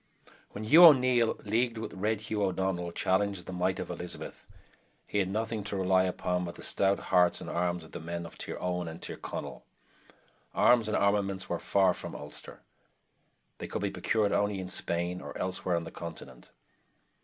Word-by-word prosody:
When 105 - -7
Hugh 155 +11 +9
O'Neill, 125 -6 +5
leagued 115 +2 0
with 110 - -5
Red 105 +2 -1
Hugh 110 -1 -3
O'Donnell, 95 -2 -1
challenged 95 +1 0
the 95 - -7
might 90 +1 0
of - - -4
Elizabeth, 90 0 -7 0.6
he 105 - -1
had 95 -2 +1
nothing 110 +1 -2
to 100 - -3
rely 95 0 +3
upon 90 0 -1
but 85 -1 -6
the - - -10
stout 100 0 +2 0.2
hearts 90 -1 +5
and - - -8
arms 85 0 -1
of 80 - -14
the - - -6
men 85 +1 -5
of 85 - -10
Tir - - -6
owen 90 -1 -2
and 80 0 -7
Tir - - -5
Conail. 65 -4 -6 0.9
Arms 120 -3 +5
and 105 - +1
armaments 100 -1 +1
were 85 - -1
far 95 -2 +3
from - - -7
Ulster. - - -8 1.0
They - - -5
could - - -4
be - - 0
procured 105 -3 +1
only 100 -1 +1
in 90 -1 -5
Spain 90 0 -2
or - - -7
elsewhere 95 -1 -1
on 85 - -1
the - - -8
continent. 65 -7 -9
95 Hz, 185 wpm, -30 LUFS, 90-105 Hz, 1.0 s, Hugh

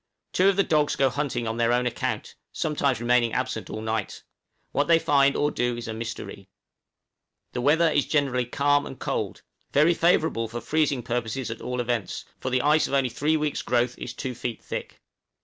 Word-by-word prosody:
Two 190 +2 +5
of 195 - +2
the 200 - +4
dogs 150 -4 +2
go 135 -2 +2
hunting 130 -5 -2
on 110 +1 -2
their 115 0 +2
own 125 +1 +2
account, 120 - -2 0.2
sometimes 140 -5 0
remaining 120 -1 +2
absent - - -2
all 110 - -5
night. 110 -2 -3 0.5
What 145 0 +1
they 165 - +6
find 140 -3 +3
or 150 0 +1
do 120 -2 -1
is 120 0 -6
a 110 - -3
mystery. 115 +1 -7 1.0
The 125 - -2
weather 160 +6 +4
is 145 - +1
generally 130 -5 +1
calm 145 +2 +2
and 135 - -9
cold, - - -3 0.3
very 155 +4 +5
favorable 160 -9 +2
for 115 +2 -5
freezing 150 -3 0
purposes 120 +1 -2
at 115 - -7
all 125 0 -3
events, 120 -4 -2
for 130 - -3
the 130 -1 +1
ice 150 +2 +4
of 140 - -1
only 135 -2 +2
three 150 +6 +1
weeks' 150 -1 -1
growth 125 0 +1
is 120 - -6
two 130 -2 -4
feet 120 -1 -5
thick. - - -6
130 Hz, 195 wpm, -26 LUFS, 120-145 Hz, 1.0 s, they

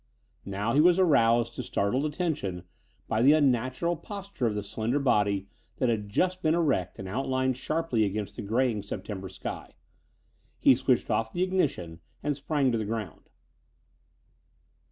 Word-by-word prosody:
Now 100 +4 -1
he 150 - +5
was 175 +2 +5
aroused 120 -9 +3
to - - -5
startled 125 +9 0
attention 145 - -3 0.4
by 110 - 0
the 140 +5 +7
unnatural 135 +3 +1
posture 195 - -4
of 105 - -1
the 105 - -2
slender 110 +6 -1
body 105 -8 +2 0.3
that 130 - +1
had 105 -3 -1
just 185 - 0
been 160 0 +2
erect 140 - 0
and 95 - -6
outlined 130 +4 0
sharply 155 -3 0
against 105 0 -3
the - - -5
graying 115 +1 0
September 95 -1 -6
sky. 95 0 -7 0.8
He - - +6
switched - - +1
off 110 0 0
the 175 - 0
ignition 140 - -1 0.2
and 145 -1 0
sprang 140 -1 0
to 115 - 0
the 110 - -2
ground. 105 -5 -5
120 Hz, 155 wpm, -28 LUFS, 105-150 Hz, 0.8 s, the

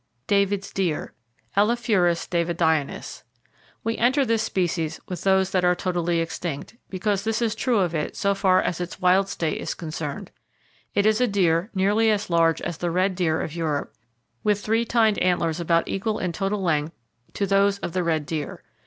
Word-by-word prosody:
David's 200 -1 +1
Deer 180 -6 -1 0.4
(Elaphurus 205 -5 +2
davidianus). 170 -4 -1 0.6
—We 225 0 -2
enter 265 +4 +3
this 225 -2 +1
species 175 -6 -1
with 180 -2 -5
those 190 -1 +2
that 185 -1 +1
are 180 0 +4
totally 175 -2 0
extinct, 165 +2 -5
because 195 +1 -1
this 220 +1 0
is 230 -3 0
true 240 +1 0
of 180 -4 +1
it 155 -2 -2
so 200 0 +1
far 190 -2 +3
as 180 - -2
its 175 - -6
wild 185 +2 +3
state 165 -3 -2
is - - -3
concerned. 155 -3 -5 0.6
It 200 - +3
is 215 +2 +3
a 250 - +4
deer 180 -2 +1
nearly 205 +4 +3
as 205 -3 0
large 165 -1 +3
as 170 -1 -4
the 175 - -1
red 185 +3 +1
deer 170 -3 0
of 155 - -5
Europe, 155 -4 -2 0.5
with 205 -1 +1
3 225 +2 +2
tined 220 -3 +2
antlers 170 -2 +1
about 170 0 +1
equal 215 +2 -1
in 180 - -2
total 195 +2 -2
length 155 -2 0 0.4
to 200 - 0
those 200 +1 +3
of 175 - -5
the 185 - 0
red 160 -3 0
deer. 155 -1 -5
185 Hz, 180 wpm, -24 LUFS, 170-205 Hz, 0.6 s, are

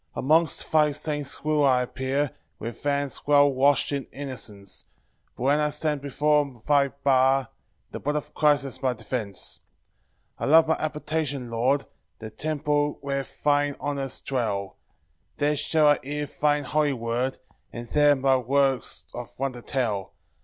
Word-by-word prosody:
3 - - -2
Amongst 160 +4 +2
thy 155 -1 +5
saints 145 -1 -4
will 150 -1 +2
I 130 -2 +4
appear, 130 +3 -1 0.3
With 115 +1 -7
hands 140 -1 -1
well 145 -1 +5
wash'd 140 +3 +3
in 140 -2 -2
innocence; 110 -8 -6 0.5
But - - -6
when 140 +3 +3
I 150 0 +2
stand 150 -1 -2
before 145 -1 +1
thy 140 -2 +4
bar, 135 -2 +2 0.4
The - - -5
blood 145 +2 -2
of 150 0 -4
Christ 150 -2 +3
is 135 - -6
my 130 -2 +1
defence. 110 -3 -4 0.8
4 - - -2
I - - 0
love 160 +2 +7
thy 160 - 0
habitation, 150 -4 -2
Lord, 130 +5 +1 0.3
The 110 -1 -8
temple 150 0 -1
where 140 0 -1 0.2
thine 145 -1 +2
honours 140 -2 -3
dwell; 105 -7 -2 0.6
There 150 0 +2
shall 150 +2 +2
I 145 0 +5
hear 145 +3 -3
thine 145 +1 0
holy 150 +1 +1
word, 120 +2 -2 0.3
And 120 0 -7
there 145 -1 +5
thy 135 0 +3
works 135 +1 0
of 120 -1 -8
wonder 130 -2 -3
tell. 115 -8 -2
140 Hz, 155 wpm, -26 LUFS, 130-150 Hz, 0.8 s, love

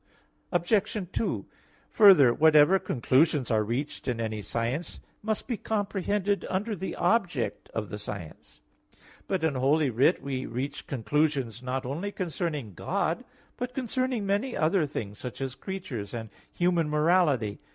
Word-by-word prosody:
Obj. 195 +2 +1
2: 225 - -1 0.5
Further, 185 - +7
whatever 155 +5 +6
conclusions 135 0 +2
are 110 -1 +3
reached 130 +7 -3
in 120 -3 -1
any 110 -2 -2
science 120 - -3 0.2
must 220 0 -2
be 240 -4 -2
comprehended 205 -1 -1
under 205 +4 -1
the 190 +1 -5
object 175 - 0
of 110 -3 -4
the 105 - -6
science. 100 -6 -9 0.7
But 185 -4 -1
in 160 -3 +2
Holy 140 +2 +2
Writ 135 +10 +3
we 135 -2 -3
reach 135 +4 -4
conclusions 135 -2 0
not 130 +1 -3
only 165 +11 -3
concerning 165 - -3
God, - - -1 0.3
but 250 0 -4
concerning 255 -3 -1
many 205 +6 0
other 160 0 +2
things, 105 -7 -5
such 125 -2 -6
as 135 -2 -3
creatures 135 - -6
and 110 -2 -6 0.2
human 175 -3 +1
morality. 150 - +2
150 Hz, 140 wpm, -28 LUFS, 125-195 Hz, 0.7 s, Further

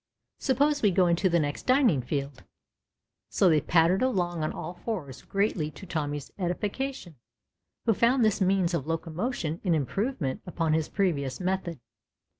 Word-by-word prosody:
Suppose 285 +3 +2
we 210 - +5
go 185 0 +3
into 175 +2 +2
the 170 - +3
next 145 -2 -3
dining 255 - +4
field? 140 +1 -4 0.9
So 190 - +3
they 155 -2 +4
pattered 165 +4 +3
along 175 -10 0
on 155 - -1
all 165 +3 -6
fours 175 - -5
greatly 195 -6 -1
to 155 +6 -11
Tommy's 145 -4 -3
edification, 195 - -3 0.7
who 225 - +4
found 235 +3 +3
this 215 -2 +1
means 185 -2 +2
of 155 -4 -2
locomotion 165 +2 -3
an 175 -4 +2
improvement 160 - -2
upon 165 -3 0
his 160 -1 0
previous 145 -10 -1
method. 185 -4 -2
175 Hz, 150 wpm, -28 LUFS, 155-205 Hz, 0.9 s, we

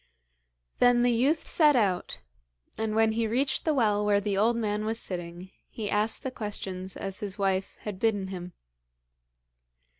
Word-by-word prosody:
Then 245 -1 +5
the 245 - +4
youth 270 +7 +1
set 300 -3 +4
out, 190 - 0 0.5
and 220 -1 -2
when 225 0 +4
he 225 0 0
reached 265 +4 0
the 315 - +3
well 210 -5 +2
where 205 -1 +3
the 200 -1 -1
old 220 +4 +3
man 210 -2 -1
was 225 +1 -1
sitting 175 0 -5 0.2
he 210 -3 -4
asked 210 +5 0
the 265 - -3
questions 190 -5 -5
as 195 -1 -4
his 200 -2 -5
wife 195 -1 -1
had 205 -3 -6
bidden 205 -4 +1
him. 180 -2 -7
210 Hz, 160 wpm, -28 LUFS, 195-230 Hz, 0.5 s, Then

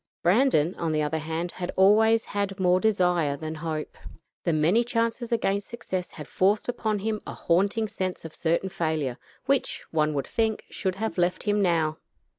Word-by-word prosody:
Brandon, 180 - +3
on 165 -1 -1
the 155 0 +1
other 160 +2 -1
hand, 160 +3 -3
had 175 -1 -5
always 220 +4 +5
had 200 -1 -3
more 180 0 +4
desire 180 -8 +2
than 155 +1 -5
hope. 155 -1 -4 0.5
The 170 - +2
many 165 +9 +3
chances 230 0 -1
against 200 -3 0
success 185 -6 -4
had 150 -2 -8
forced 200 +3 +1
upon 220 -3 -1
him 215 +1 -2
a - - -6
haunting 200 +6 +1
sense 185 -4 -4
of 160 - -8
certain 170 +3 0
failure, 155 -8 -2 0.3
which, 275 -1 0
one 155 -1 +1
would 140 - -1
think, 220 -1 -1
should 190 -2 -2
have 220 -1 -3
left 175 +1 +1
him 205 -1 +1
now. 160 -4 +1
185 Hz, 175 wpm, -26 LUFS, 160-215 Hz, 0.5 s, always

